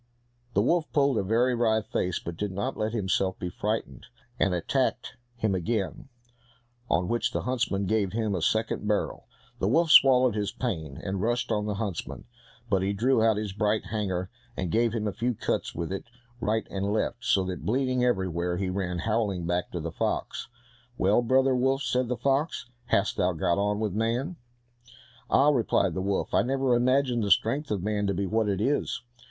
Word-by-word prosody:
The 100 - +4
wolf 165 +4 +1
pulled 140 -4 +3
a - - 0
very 120 +6 +2
wry 115 -2 +2
face, 90 -3 -1
but 85 - -6
did 105 +3 -3
not 100 +2 -3
let 110 0 -1
himself 95 -3 0
be 90 - -4
frightened, 105 - -3 0.3
and 95 - +3
attacked 125 +12 -1 0.2
him 110 -4 0
again, 110 - -2 0.8
on 90 +2 +1
which 120 +3 0
the - - -2
huntsman 120 -6 -1
gave 105 -2 +1
him 110 -1 -1
the 90 -3 -1
second 110 +3 0
barrel. 105 -1 -1 0.3
The 95 - +1
wolf 160 +8 +3
swallowed 130 -3 +7
his 105 -1 -2
pain, 80 - -4
and 95 -1 -2
rushed 120 +2 0
on 105 -1 0
the 105 - -1
huntsman, 100 -5 -4 0.4
but 100 -5 +1
he 100 +2 0
drew 115 +3 +2
out 110 -2 +3
his 105 -2 -3
bright 105 +1 0
hanger, 95 -4 -2 0.3
and 90 -3 -2
gave 115 0 +2
him 110 -1 -2
a 100 - -2
few 120 0 -1
cuts - - -2
with 85 +1 -3
it 95 - -5 0.3
right 110 +1 0
and 100 +1 -1
left, 110 +3 -1
so 100 -6 +3
that, 95 -1 -5
bleeding 130 +2 +1
everywhere, 90 -6 0
he 95 0 -1
ran 90 -2 -2
howling 105 -2 -1
back 90 +1 -1
to 90 - -4
the 85 +1 -4
fox. - - -2 0.5
"Well, 100 +5 +3
brother 130 +2 +3
wolf," 135 +2 +1
said 125 0 0
the 125 0 -2
fox, 140 +7 0 0.2
"how - - +4
hast - - -1
thou 90 0 +2
got 85 +3 0
on 105 +1 0
with 105 -4 -1
man?" 120 - -1 0.9
"Ah!" 140 +2 +5
replied 115 - +2
the 95 - -2
wolf, 100 +1 -1
"I - - +5
never 135 0 +1
imagined 125 -1 +2
the 100 - -1
strength 135 +9 +2
of 100 -4 -2
man 105 -1 0
to 100 - 0
be 100 +2 -1
what 110 +2 +1
it 100 -1 0
is! 135 +4 0
105 Hz, 195 wpm, -27 LUFS, 95-125 Hz, 0.9 s, swallowed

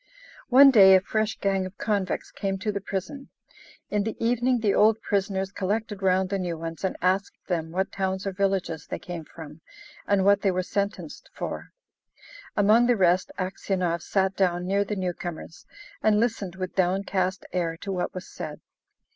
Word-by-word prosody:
One 270 +2 +8
day 190 -5 +8
a - - +7
fresh 215 +3 -1
gang 195 -1 0
of 185 - -14
convicts 200 -4 -2
came 195 -1 -2
to 210 +3 -2
the 200 -1 -4
prison. 200 +9 -5 0.6
In 210 - +1
the 220 +1 -4
evening 245 +2 +1
the 210 -3 +2
old 220 +1 +4
prisoners 195 -2 -1
collected 205 +1 -2
round 190 0 +2
the 195 0 -1
new 175 -3 -3
ones 165 +2 -6
and 190 - -1
asked 190 +2 +1
them 165 -3 -2
what 190 +3 -2
towns 190 0 -2
or 195 - -1
villages 190 -4 -1
they - - -4
came 170 -3 -7
from, 155 0 -11 0.5
and 200 -2 +2
what 200 0 +5
they 200 - +2
were 185 0 0
sentenced 200 +2 -4
for. - - -5 0.9
Among 215 +4 +5
the 245 -2 +3
rest 185 0 +2
Aksionov 185 -2 -2
sat 190 +1 0
down 180 -2 +1
near 200 +2 +1
the 210 +1 -4
newcomers, 175 -3 -5 0.3
and 210 -1 +3
listened 215 -6 -1
with 185 -1 -5
downcast 190 0 0
air 170 -2 -1
to 195 - -6
what 180 -2 -2
was 185 - -6
said. - - -7
190 Hz, 175 wpm, -26 LUFS, 185-205 Hz, 0.9 s, One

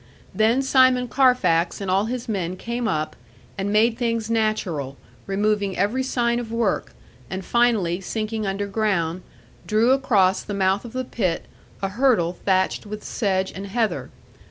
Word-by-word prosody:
Then 225 +7 +3
Simon 255 -2 +4
Carfax 250 -11 +2
and 195 -2 -2
all 195 +2 +2
his 245 +1 -4
men 185 -4 -2
came 235 +3 -3
up, 155 -6 -2 0.4
and 195 +1 -2
made 225 +2 +3
things 230 -2 -1
natural, 185 -12 -1 0.3
removing 200 0 0
every 210 +7 +1
sign 240 -2 0
of 230 -2 -6
work; 230 -3 -1 0.4
and 190 0 -5
finally, 215 -7 +2
sinking 215 +2 -3
underground, 195 -3 -1 0.5
drew 225 +3 +3
across 210 -9 +3
the 205 - -5
mouth 195 +2 +1
of 235 - -9
the 255 0 -2
pit 185 -9 -2 0.4
a 195 - +1
hurdle 205 -6 +1
thatched 190 +2 +1
with 210 +1 -7
sedge 190 -3 -1
and 195 +2 -7
heather. 225 +2 -1
215 Hz, 150 wpm, -23 LUFS, 190-235 Hz, 0.5 s, Simon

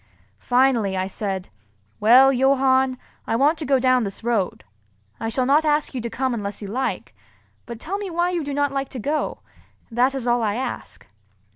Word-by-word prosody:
Finally 245 -6 +2
I 185 - 0
said, 195 -1 -4 0.5
"Well, 255 +5 +6
Johann, 265 0 +2 0.3
I 225 - 0
want 290 +6 +2
to 305 - -5
go 270 -1 +4
down 255 -1 +3
this 200 +1 -6
road. 225 -6 -1 0.6
I 225 - -2
shall 255 +2 0
not 290 +4 +4
ask 300 -1 +1
you 255 - -3
to 235 - -4
come 260 +1 -1
unless 205 -3 -4
you 205 - -7
like; 255 +7 -3 0.5
but 235 -1 -7
tell 385 +10 -4
me 405 -2 -5
why 345 +1 0
you 345 -3 -2
do 285 - -5
not 285 -1 +1
like 275 0 -3
to 255 - -7
go, 295 +6 -2 0.5
that 250 +4 +2
is 260 -3 -4
all 240 0 +2
I 210 -2 0
ask." 260 +2 -6
255 Hz, 190 wpm, -22 LUFS, 225-275 Hz, 0.6 s, Well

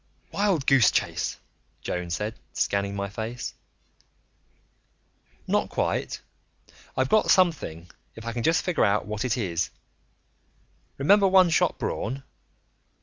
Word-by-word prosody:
"Wild 195 -8 +1
goose 135 -6 +6
chase?" - - -1 0.5
Joan 90 -1 -3
said, 105 +5 -2 0.2
scanning 100 0 0
my 100 0 -2
face. 110 +4 -5 1.9
"Not - - +1
quite. - - -1 0.8
I've 130 - +2
got 215 - +3
something, 160 - +2 0.3
if 115 - -10
I 115 - -3
can 120 - -3
just 165 +8 +2
figure 180 -3 +1
out 100 0 +2
what 105 0 -3
it 125 -2 0
is. 85 -7 -1 1.3
Remember 195 +8 +5
One 185 -2 +5
Shot - - +2
Braun?" 135 +4 -3
120 Hz, 120 wpm, -26 LUFS, 100-165 Hz, 1.9 s, goose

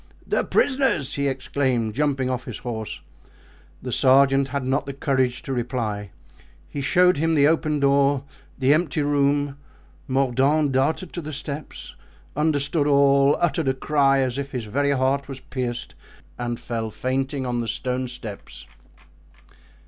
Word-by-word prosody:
"The - - 0
prisoners!" 260 - +1
he 140 0 0
exclaimed, 130 -4 -1
jumping 140 -1 0
off 130 0 -3
his - - -6
horse. 110 -3 -6 0.8
The - - -4
sergeant 135 +1 +4
had 140 -1 -3
not 135 +2 0
the 140 - -4
courage 130 -3 0
to 135 - -4
reply; 115 -5 -3 0.6
he 140 - -5
showed 180 +4 +4
him 160 +2 +1
the 145 -1 +5
open 155 -1 +1
door, 140 0 +3 0.3
the 135 +1 +4
empty 155 -2 0
room. 145 0 +1 0.5
Mordaunt 135 +3 +2
darted 150 +7 0
to 175 - -4
the 155 -1 -6
steps, 145 +1 -7 0.4
understood 150 0 +1
all, 140 0 +4
uttered 165 -3 0
a 130 - +2
cry, 135 0 +2
as 130 0 -1
if 140 0 -5
his 125 -3 -3
very 140 +7 0
heart 135 0 +1
was 135 -1 -7
pierced, 125 -2 -5 0.5
and 120 -1 -3
fell 115 -2 -4
fainting 130 +4 -2
on 120 -1 -1
the 115 - -4
stone 125 +3 -2
steps. 115 -5 -9
135 Hz, 150 wpm, -23 LUFS, 130-145 Hz, 0.8 s, the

